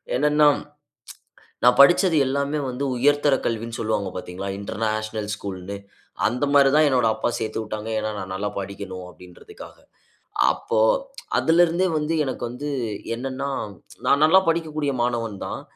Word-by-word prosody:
என்னன்னா, 150 Hz, +2 st, +4 dB, 1.2 s
நான் 125 Hz, 0 st, +6 dB
படிச்சது 175 Hz, +3 st, +5 dB
எல்லாமே 140 Hz, +3 st, -1 dB
வந்து 125 Hz, +3 st, -4 dB
உயர்தர 145 Hz, +2 st, +3 dB
கல்வின்னு 115 Hz, 0 st, -3 dB
சொல்வாங்க 105 Hz, -3 st, -1 dB
பார்த்தீங்களா? 90 Hz, +2 st, -6 dB
இன்டர்நேஷனல் 110 Hz, +1 st, -3 dB
ஸ்கூல்னு. 100 Hz, -1 st, -6 dB, 0.5 s
அந்தமாரிதான் 140 Hz, +4 st, +4 dB
என்னோட 125 Hz, -4 st, +2 dB
அப்பா 110 Hz, -, -1 dB
சேர்த்துவுட்டாங்க. 110 Hz, 0 st, -4 dB
ஏன்னா, 110 Hz, -, -2 dB
நான் 95 Hz, 0 st, -6 dB
நல்லா 100 Hz, +2 st, -2 dB
படிக்கணும், 95 Hz, -1 st, -7 dB
அப்பிடின்றதுக்காக. 90 Hz, -, -13 dB, 0.8 s
அப்போ -, -, -2 dB, 0.6 s
அதுலருந்தே 170 Hz, +2 st, +3 dB
வந்து 150 Hz, +2 st, -1 dB
எனக்கு 130 Hz, -, -4 dB
வந்து 140 Hz, +5 st, -5 dB, 0.5 s
என்னன்னா, 135 Hz, +2 st, -4 dB, 0.6 s
நான் 140 Hz, -, +4 dB
நல்லா 185 Hz, +4 st, +6 dB
படிக்கக்கூடிய 155 Hz, -3 st, -1 dB
மாணவன் 115 Hz, -4 st, -1 dB
தான். -, -, -5 dB
125 Hz, 120 wpm, -23 LUFS, 105-145 Hz, 1.2 s, நான்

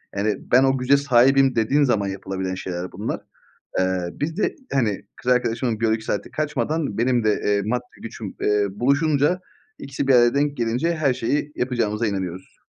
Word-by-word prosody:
Yani 105 Hz, +1 st, 0 dB, 0.2 s
ben 130 Hz, +2 st, +6 dB
o 135 Hz, 0 st, +3 dB
güce 130 Hz, +2 st, +3 dB
sahibim 135 Hz, 0 st, +4 dB
dediğin 125 Hz, +6 st, +2 dB
zaman 110 Hz, -7 st, +1 dB
yapılabilen 95 Hz, -1 st, -4 dB
şeyler 90 Hz, -1 st, -5 dB
bunlar. 105 Hz, +4 st, -4 dB, 0.6 s
Eee, 95 Hz, -1 st, 0 dB
biz 160 Hz, +3 st, -4 dB
de -, -, 0 dB, 0.2 s
hani 110 Hz, -7 st, 0 dB
kız 125 Hz, -, +1 dB
arkadaşımın 120 Hz, -2 st, 0 dB
biyolojik 110 Hz, -1 st, +1 dB
saati 100 Hz, -2 st, -3 dB
kaçmadan 150 Hz, -4 st, -2 dB
benim 120 Hz, 0 st, +2 dB
de, 110 Hz, -, +4 dB
eee, 100 Hz, 0 st, +2 dB
maddi 125 Hz, +3 st, -1 dB, 0.2 s
gücüm, 110 Hz, -3 st, -7 dB
eee, 105 Hz, -1 st, +2 dB
buluşunca. 145 Hz, -, +1 dB, 0.4 s
İkisi 135 Hz, 0 st, -4 dB
bir 135 Hz, -, +6 dB
araya 120 Hz, 0 st, +5 dB
denk 145 Hz, 0 st, +1 dB
gelince 125 Hz, +8 st, 0 dB
her 140 Hz, -5 st, +1 dB
şeyi 145 Hz, +5 st, -1 dB
yapacağımıza 115 Hz, -3 st, -1 dB
inanıyoruz. 95 Hz, -3 st, -4 dB
120 Hz, 165 wpm, -22 LUFS, 105-135 Hz, 0.6 s, ben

